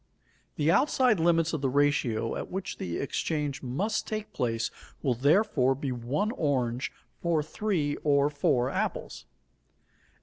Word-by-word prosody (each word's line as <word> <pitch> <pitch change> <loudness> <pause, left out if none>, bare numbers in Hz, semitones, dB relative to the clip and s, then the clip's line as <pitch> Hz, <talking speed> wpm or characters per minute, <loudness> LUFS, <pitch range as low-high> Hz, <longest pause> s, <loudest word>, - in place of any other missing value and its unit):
The 150 +2 +2
outside 255 - +3
limits 165 0 +3
of 155 - -2
the 135 - +1
ratio 130 -5 +1
at - - -5
which 190 +1 -5
the 85 -2 -3
exchange 145 0 -2
must 185 - -2
take 215 -1 -4
place 115 -3 -1 0.3
will, 130 - +2
therefore, 135 - +3
be 135 0 -3
one 130 - -1
orange 130 - -1 0.3
for 165 -3 +1
three 155 -3 -1
or 145 -1 +2
four 135 -3 +1
apples. - - -3
145 Hz, 135 wpm, -28 LUFS, 130-170 Hz, 0.3 s, outside